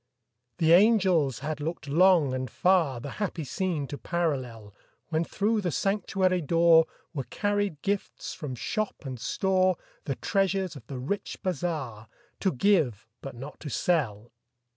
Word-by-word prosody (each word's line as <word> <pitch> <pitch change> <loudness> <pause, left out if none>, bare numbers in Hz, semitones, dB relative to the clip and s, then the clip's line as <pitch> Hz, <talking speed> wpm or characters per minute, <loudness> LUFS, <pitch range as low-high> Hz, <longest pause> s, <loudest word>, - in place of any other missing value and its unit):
The 160 0 +3
angels 180 - +4
had 155 -1 -3
looked 155 -1 -4
long 165 -2 +4
and 130 -1 -3
far 165 - +2
The 135 +3 -7
happy 180 -5 -2
scene 160 +1 -2
to 145 - -6
parallel, 130 - -2 0.4
When 160 0 +1
through 210 +5 0
the 180 - -1
sanctuary 190 0 +1
door 165 +1 +5 0.3
Were 135 -5 -3
carried 205 -6 -1
gifts 200 0 -3
from 140 -5 -6
shop 215 - -3
and 130 -3 -5
store, 185 +4 +1 0.3
The 135 - -2
treasures 195 -2 0
of 120 -5 -12
the 135 - -6
rich 145 +11 -3
bazaar, 150 - -3 0.3
To 190 - +1
give 135 - +2 0.2
but 135 -3 -7
not 135 +5 -9
to 150 - -6
sell. 120 - 0
165 Hz, 145 wpm, -28 LUFS, 135-190 Hz, 0.4 s, door